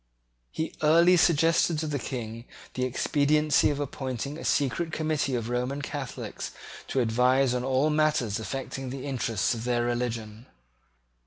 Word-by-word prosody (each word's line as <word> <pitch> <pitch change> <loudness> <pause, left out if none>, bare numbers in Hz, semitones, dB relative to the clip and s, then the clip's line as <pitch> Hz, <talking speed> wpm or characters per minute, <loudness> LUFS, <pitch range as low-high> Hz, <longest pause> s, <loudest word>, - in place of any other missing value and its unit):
He 160 - -4
early 170 +4 +6
suggested 165 0 +3
to 160 - -2
the 145 -2 -2
King 115 -2 -5 0.3
the 130 - -1
expediency 145 +3 +2
of 145 -1 -2
appointing 135 -1 -4
a - - -8
secret 155 +4 0
committee 155 -4 -1
of 115 -2 -2
Roman 125 +4 -2
Catholics 140 -3 -5 0.4
to 135 - 0
advise 125 +3 +3
on 125 0 -1
all 135 +4 +2
matters 150 -9 +1
affecting 135 +4 -5
the 135 +1 -6
interests 115 -7 0
of 115 -1 -5
their 120 -1 0
religion. 120 -2 -3
135 Hz, 145 wpm, -27 LUFS, 120-150 Hz, 0.4 s, early